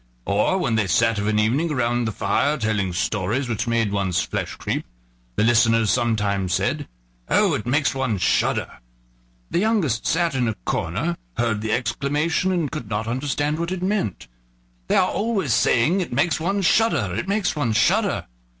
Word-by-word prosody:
Or, 105 - +1
when 120 -11 0
they 105 -3 +1
sat 115 +4 +2
of 100 - -1
an 105 0 +1
evening 130 +10 +1
around 120 -3 0
the 110 - -1
fire 110 +9 0
telling 105 -5 -1
stories 105 +6 -1
which 115 -1 -2
made 115 -3 +1
one's 95 -3 0
flesh - - -3
creep, - - -3 0.5
the - - +2
listeners 115 -2 +4
sometimes 105 -6 0
said: 130 +10 -1 0.4
"Oh! - - +3
it 105 - -3
makes 145 +4 +2
one 130 -6 -1
shudder," 90 - 0 0.7
the - - +1
youngest 185 - +1
sat 170 -1 +1
in 125 -3 0
a 110 - -1
corner, 105 - -1 0.2
heard 115 -3 0
the 110 0 -2
exclamation, 140 +9 0
and 170 -6 -1
could 125 -9 -6
not 105 +2 -2
understand 145 +5 -1
what 170 +1 -2
it 185 -1 -3
meant. 190 - -2 0.6
"They - - +1
are 185 - +4
always 200 - 0
saying 120 - +3
it 180 - -4
makes 145 +6 +1
one 195 +5 -1
shudder! 175 - +2
it 170 - -3
makes 200 -3 0
one 130 -7 0
shudder! 185 - +2
120 Hz, 175 wpm, -22 LUFS, 110-165 Hz, 0.7 s, listeners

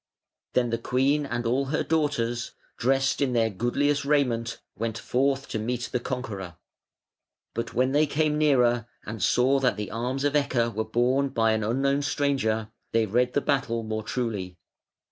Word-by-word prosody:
Then 120 -2 +2
the 115 - 0
queen 140 +5 +1
and 120 -2 -3
all 130 +4 +1
her 145 +3 -1
daughters, 130 -7 -1 0.2
dressed 135 +3 +1
in 135 -3 +1
their 115 -2 +2
goodliest 140 +7 0
raiment, 125 -6 +1 0.2
went 115 0 -3
forth 135 +4 0
to 110 - -2
meet 120 +2 -2
the 125 - 0
conqueror. 105 -9 -5 1.0
But 115 - -4
when 130 +1 +2
they 150 +2 +3
came 150 +1 +1
nearer 125 -6 +3 0.2
and 110 -1 -6
saw 125 +7 +3
that 130 -4 +1
the 105 -1 -4
arms 125 +5 -2
of 145 0 +1
Ecke 120 -5 +1
were 110 +2 -2
borne 130 +4 +1
by 115 -3 +2
an 110 0 0
unknown 135 +5 +1
stranger, 135 -6 0 0.2
they 115 -1 +3
read 125 +4 +1
the 145 - +2
battle 125 -5 0
more 110 0 -3
truly. 105 -7 -3
125 Hz, 165 wpm, -26 LUFS, 115-140 Hz, 1.0 s, they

